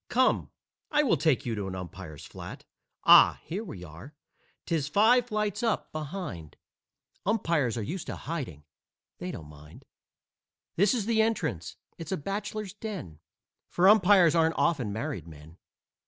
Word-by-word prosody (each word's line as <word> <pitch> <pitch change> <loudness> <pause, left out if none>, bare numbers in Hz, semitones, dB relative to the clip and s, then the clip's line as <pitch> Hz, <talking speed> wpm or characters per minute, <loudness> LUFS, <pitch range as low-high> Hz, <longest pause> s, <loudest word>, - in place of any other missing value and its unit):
Come, 255 +1 +2 0.4
I 300 - +3
will 240 - +3
take 155 -2 +1
you 120 - -1
to 100 -3 -3
an 95 - -5
umpire's 90 -4 -8
flat. - - -10 0.4
Ah! - - +8
Here 195 +6 -4
we 105 - -8
are! 85 - -12 0.5
'Tis 160 -5 -1
five 230 +9 +4
flights 210 -2 -1
up, 230 -3 -1
behind; 150 - -6 0.7
Umpires 165 - +1
are 115 - -2
used 170 - -5
to - - -4
hiding 130 - -6 0.6
they 180 - -5
don't 80 - -7
mind. 75 +1 -15 0.9
This 200 +6 +3
is 220 -5 -1
the 225 0 +3
entrance. 125 - -1 0.2
It's 165 -2 -7
a 190 - 0
bachelor's 200 +4 -4
den, 195 - -7 0.5
For 180 +2 +3
umpires 195 -5 +6
aren't 165 -1 +2
often 130 -11 +1
married 100 -6 -4
men. 80 +1 -14
165 Hz, 150 wpm, -28 LUFS, -, 0.9 s, Ah